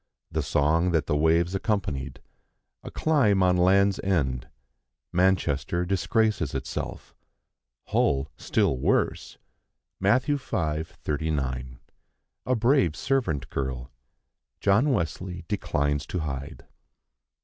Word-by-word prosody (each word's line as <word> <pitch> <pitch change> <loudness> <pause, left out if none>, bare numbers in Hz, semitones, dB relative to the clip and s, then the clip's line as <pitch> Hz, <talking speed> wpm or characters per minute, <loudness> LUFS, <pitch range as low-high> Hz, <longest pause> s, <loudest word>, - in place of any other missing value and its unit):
The 80 - 0
song 75 +4 +2
that 80 -4 +2
the 75 - 0
waves 85 +4 +2
accompanied. 75 - -2 0.6
A - - -8
climb 115 -12 +2
on 90 -1 +4
Land's 95 +2 +3
End. 65 -10 0 0.7
Manchester 90 -3 +1
disgraces 95 - 0
itself. - - -5 0.8
Hull 70 0 +1
still 65 - +1
worse. - - 0 0.6
Matt. 105 +7 +3
v. 145 0 0
39. 75 - -3 0.7
A 130 - +2
brave 115 - +3
servant 115 - -1
girl. 65 -1 -4 0.7
John 105 +9 +3
Wesley 90 - -2
declines 75 -1 -1
to 90 - -3
hide. 70 0 -6
85 Hz, 100 wpm, -26 LUFS, 70-100 Hz, 0.8 s, on